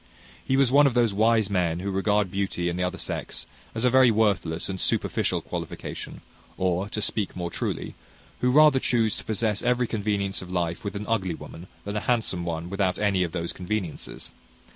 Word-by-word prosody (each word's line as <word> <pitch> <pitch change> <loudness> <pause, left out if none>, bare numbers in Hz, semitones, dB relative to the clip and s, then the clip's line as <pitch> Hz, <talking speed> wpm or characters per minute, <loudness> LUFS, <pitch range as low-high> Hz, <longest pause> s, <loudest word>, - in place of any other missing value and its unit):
He 135 - +1
was 135 -3 +4
one 145 +1 +7
of 130 - -1
those 120 -4 +3
wise 110 0 +3
men 90 -4 0
who 100 +1 -2
regard 100 0 +1
beauty 95 -3 -1
in 85 - -3
the 90 - -1
other 90 - -2
sex - - -4 0.3
as 115 +2 0
a - - +6
very 130 -1 +6
worthless 100 -7 +1
and 95 -1 -4
superficial - - +1
qualification; - - -6 0.4
or, 95 +2 0
to 105 - -3
speak 105 -2 -2
more 85 -1 -3
truly, - - -3 0.5
who 125 - +2
rather 150 0 +6
chuse 115 -4 +1
to - - -7
possess 110 -1 0
every 125 0 +2
convenience 100 -3 -1
of 90 -1 -9
life 85 -2 -1
with 100 0 -4
an 105 +1 -4
ugly 95 -7 0
woman, 85 +3 -10 0.2
than 100 +1 -4
a - - +1
handsome 110 -7 +1
one 85 0 -3
without 95 -1 0
any 100 -3 +1
of 85 -2 0
those 85 0 -3
conveniences. 90 -2 -5
100 Hz, 195 wpm, -26 LUFS, 90-115 Hz, 0.5 s, one